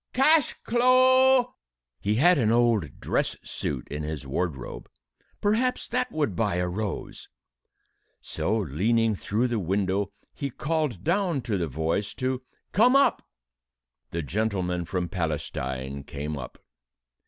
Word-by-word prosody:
Cash 300 Hz, +2 st, +4 dB
clo'!" 255 Hz, +1 st, +5 dB, 0.5 s
He 105 Hz, +7 st, 0 dB
had 170 Hz, +6 st, +5 dB
an 110 Hz, -3 st, +3 dB
old 115 Hz, -8 st, +2 dB
dress -, -, -1 dB
suit 65 Hz, -4 st, -4 dB
in 75 Hz, +2 st, -4 dB
his 75 Hz, -1 st, -4 dB
wardrobe. 70 Hz, -2 st, -4 dB, 0.5 s
Perhaps 230 Hz, +5 st, +1 dB
that 250 Hz, +1 st, -1 dB
would 145 Hz, -, -1 dB
buy 100 Hz, -1 st, 0 dB
a 90 Hz, 0 st, 0 dB
rose! 100 Hz, +2 st, -5 dB, 0.9 s
So, 110 Hz, +3 st, -1 dB
leaning 110 Hz, -, +1 dB
through 105 Hz, +4 st, -1 dB
the 120 Hz, -2 st, -1 dB
window, 95 Hz, +1 st, 0 dB, 0.2 s
he 140 Hz, -, -4 dB
called 150 Hz, -, -2 dB
down 175 Hz, -4 st, +1 dB
to 115 Hz, -3 st, -2 dB
the 85 Hz, -3 st, -1 dB
voice 80 Hz, +7 st, -2 dB
to 130 Hz, 0 st, -1 dB, 0.3 s
"come 245 Hz, +6 st, +5 dB
up." 275 Hz, -, +4 dB, 0.9 s
The 85 Hz, +4 st, -3 dB
gentleman 90 Hz, -1 st, -1 dB
from 90 Hz, +1 st, -2 dB
Palestine 70 Hz, -5 st, -3 dB
came 75 Hz, +2 st, -5 dB
up. 60 Hz, -4 st, -8 dB
105 Hz, 130 wpm, -26 LUFS, -, 0.9 s, clo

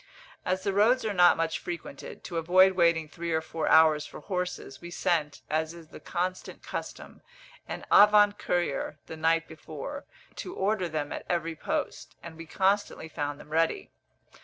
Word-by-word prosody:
As 185 Hz, +1 st, 0 dB
the 200 Hz, -, 0 dB
roads 225 Hz, +5 st, +3 dB
are 215 Hz, -, -1 dB
not 180 Hz, -2 st, +6 dB
much 165 Hz, -1 st, -1 dB
frequented, 170 Hz, -5 st, -8 dB
to 175 Hz, -, -5 dB
avoid 185 Hz, +3 st, +5 dB
waiting 170 Hz, -3 st, +2 dB
three 170 Hz, +2 st, -5 dB
or 160 Hz, -, +2 dB
four 160 Hz, 0 st, -4 dB
hours 155 Hz, -2 st, +6 dB
for -, -, -10 dB
horses, 180 Hz, -6 st, -4 dB
we 175 Hz, -, -8 dB
sent, 170 Hz, -4 st, -1 dB
as 160 Hz, +2 st, -1 dB
is 165 Hz, -2 st, -13 dB
the -, -, -11 dB
constant 185 Hz, +1 st, -4 dB
custom, -, -, -7 dB, 0.5 s
an -, -, -6 dB
avant 205 Hz, 0 st, +6 dB
courier 175 Hz, -4 st, -1 dB
the 160 Hz, -, -8 dB
night 165 Hz, +1 st, +1 dB
before, 160 Hz, -, -8 dB, 0.3 s
to 365 Hz, -, -6 dB
order 195 Hz, -2 st, 0 dB
them 150 Hz, -2 st, -3 dB
at -, -, -6 dB
every 165 Hz, -2 st, -1 dB
post, -, -, -4 dB
and 170 Hz, -1 st, -9 dB
we 165 Hz, 0 st, -10 dB
constantly 195 Hz, -2 st, 0 dB
found 145 Hz, -1 st, -4 dB
them 150 Hz, -, -13 dB
ready. 165 Hz, +1 st, 0 dB
170 Hz, 170 wpm, -28 LUFS, 160-185 Hz, 0.5 s, not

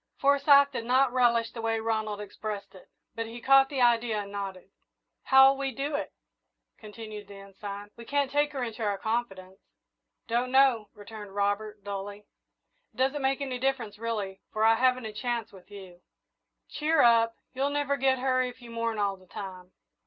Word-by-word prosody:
Forsyth 280 Hz, 0 st, +5 dB
did 235 Hz, -4 st, -4 dB
not 255 Hz, +1 st, +3 dB
relish 235 Hz, -2 st, +2 dB
the 230 Hz, -, -7 dB
way 225 Hz, 0 st, 0 dB
Ronald 220 Hz, -2 st, -2 dB
expressed 205 Hz, 0 st, -6 dB
it, 185 Hz, -, -16 dB, 0.2 s
but 230 Hz, 0 st, -4 dB
he 230 Hz, +1 st, -8 dB
caught 270 Hz, +2 st, +5 dB
the 275 Hz, -3 st, -2 dB
idea 230 Hz, -3 st, +2 dB
and 200 Hz, -, -11 dB
nodded. 195 Hz, -2 st, -6 dB, 0.5 s
"How'll 265 Hz, 0 st, +7 dB
we 275 Hz, 0 st, -2 dB
do 280 Hz, +4 st, -4 dB
it?" 290 Hz, -, -3 dB, 0.7 s
continued 215 Hz, -1 st, -9 dB
the 200 Hz, -, -11 dB
Ensign. 200 Hz, +1 st, -9 dB
"We 235 Hz, -, -11 dB
can't 285 Hz, +1 st, 0 dB
take 290 Hz, +1 st, +1 dB
her 265 Hz, -3 st, -3 dB
into 230 Hz, -1 st, -5 dB
our 205 Hz, -2 st, 0 dB
confidence." 195 Hz, -4 st, -3 dB, 0.7 s
"Don't 240 Hz, +2 st, 0 dB
know," 260 Hz, -5 st, +4 dB
returned 205 Hz, -1 st, -10 dB
Robert, 205 Hz, +1 st, -1 dB
dully. 200 Hz, 0 st, -6 dB, 0.7 s
"It -, -, -25 dB
doesn't 270 Hz, +3 st, +1 dB
make 270 Hz, +1 st, 0 dB
any 260 Hz, -3 st, -3 dB
difference, 245 Hz, -6 st, -2 dB
really, 210 Hz, -4 st, -4 dB
for 215 Hz, -, -1 dB
I 225 Hz, 0 st, +6 dB
haven't 255 Hz, +1 st, +2 dB
a 215 Hz, -, -6 dB
chance 240 Hz, +1 st, -3 dB
with 190 Hz, -1 st, -16 dB
you." 190 Hz, -3 st, -12 dB, 0.7 s
"Cheer 310 Hz, 0 st, +1 dB
up 230 Hz, -1 st, +4 dB, 0.2 s
you'll 270 Hz, +2 st, 0 dB
never 285 Hz, -1 st, 0 dB
get 265 Hz, -1 st, +2 dB
her 255 Hz, 0 st, +1 dB
if 250 Hz, 0 st, -4 dB
you 240 Hz, -2 st, -12 dB
mourn 230 Hz, -1 st, -2 dB
all 200 Hz, -2 st, 0 dB
the 185 Hz, 0 st, -21 dB
time. 185 Hz, -2 st, -8 dB
230 Hz, 180 wpm, -28 LUFS, 205-265 Hz, 0.7 s, How'll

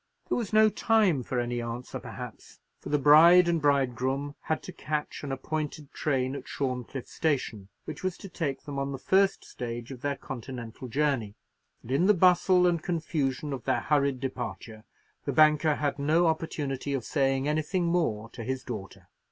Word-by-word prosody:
There -, -, +1 dB
was 225 Hz, -5 st, -4 dB
no 215 Hz, 0 st, +6 dB
time 210 Hz, -, +2 dB
for 125 Hz, +1 st, -2 dB
any 120 Hz, 0 st, -2 dB
answer, 115 Hz, +1 st, -5 dB
perhaps, -, -, -9 dB, 0.2 s
for -, -, -8 dB
the 150 Hz, -, +3 dB
bride 165 Hz, +5 st, +7 dB
and 170 Hz, -2 st, +1 dB
bridegroom 140 Hz, 0 st, +1 dB
had 160 Hz, -, -2 dB
to 185 Hz, -, -8 dB
catch 150 Hz, -1 st, -4 dB
an 140 Hz, -, -4 dB
appointed 150 Hz, +2 st, -4 dB
train 135 Hz, -2 st, 0 dB
at -, -, -8 dB
Shorncliffe 130 Hz, -1 st, -4 dB
station, 125 Hz, -10 st, -2 dB, 0.2 s
which -, -, -7 dB
was 185 Hz, -2 st, -2 dB
to -, -, -9 dB
take 155 Hz, -7 st, -3 dB
them 140 Hz, -1 st, -5 dB
on 140 Hz, 0 st, -2 dB
the -, -, -4 dB
first 195 Hz, +7 st, +2 dB
stage 120 Hz, 0 st, -6 dB
of 125 Hz, -2 st, -9 dB
their 140 Hz, 0 st, -1 dB
Continental 125 Hz, -2 st, -7 dB
journey; 130 Hz, -6 st, 0 dB, 0.5 s
and 120 Hz, -, -8 dB
in 165 Hz, +8 st, +3 dB
the 210 Hz, -, +6 dB
bustle 180 Hz, 0 st, +5 dB
and 170 Hz, -2 st, +2 dB
confusion 150 Hz, -5 st, -2 dB
of 135 Hz, -, -6 dB
their 130 Hz, -, +1 dB
hurried 140 Hz, -3 st, +1 dB
departure, 115 Hz, -4 st, -6 dB, 0.4 s
the -, -, -1 dB
banker 155 Hz, 0 st, +5 dB
had 145 Hz, -1 st, -2 dB
no 155 Hz, +5 st, +3 dB
opportunity 145 Hz, -4 st, -1 dB
of 125 Hz, -4 st, -4 dB
saying 135 Hz, -2 st, +1 dB
anything 155 Hz, +4 st, 0 dB
more 160 Hz, -11 st, 0 dB
to 115 Hz, -, -7 dB
his 130 Hz, +2 st, -3 dB
daughter. 95 Hz, -5 st, -8 dB
140 Hz, 175 wpm, -28 LUFS, 130-160 Hz, 0.5 s, bride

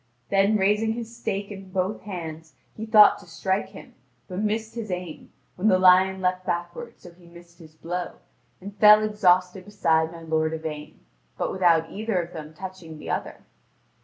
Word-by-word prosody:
Then 200 Hz, +2 st, +3 dB
raising 210 Hz, +3 st, +1 dB
his 235 Hz, 0 st, -7 dB
stake 200 Hz, -3 st, -4 dB
in 195 Hz, -1 st, -10 dB
both 185 Hz, +2 st, -2 dB
hands, 160 Hz, -5 st, -8 dB, 0.2 s
he 220 Hz, +1 st, -6 dB
thought 215 Hz, -1 st, +7 dB
to 195 Hz, -, -16 dB
strike 190 Hz, +5 st, -2 dB
him, 195 Hz, -, -13 dB, 0.3 s
but 180 Hz, -, -5 dB
missed 220 Hz, +1 st, -2 dB
his 225 Hz, -3 st, -6 dB
aim, 180 Hz, -3 st, -6 dB, 0.3 s
when 190 Hz, +4 st, 0 dB
the 190 Hz, -3 st, +5 dB
lion 185 Hz, +1 st, +4 dB
leaded 185 Hz, 0 st, 0 dB
backward 175 Hz, +6 st, -5 dB
so 175 Hz, -, -13 dB
he 170 Hz, 0 st, -20 dB
missed 170 Hz, 0 st, -17 dB
his 155 Hz, -2 st, -15 dB
blow, 175 Hz, +3 st, -5 dB, 0.5 s
and 200 Hz, +2 st, -10 dB
fell 210 Hz, +1 st, +7 dB
exhausted 185 Hz, -3 st, +2 dB
beside 165 Hz, -6 st, +1 dB
my 170 Hz, -1 st, -11 dB
lord 160 Hz, 0 st, 0 dB
Yvain, 155 Hz, -1 st, -7 dB, 0.4 s
but -, -, -2 dB
without 170 Hz, -3 st, +2 dB
either 215 Hz, -2 st, -2 dB
of 170 Hz, +1 st, -5 dB
them 155 Hz, -2 st, -8 dB
touching 185 Hz, -3 st, -9 dB
the -, -, -6 dB
other. -, -, -4 dB
185 Hz, 175 wpm, -25 LUFS, 170-205 Hz, 0.5 s, thought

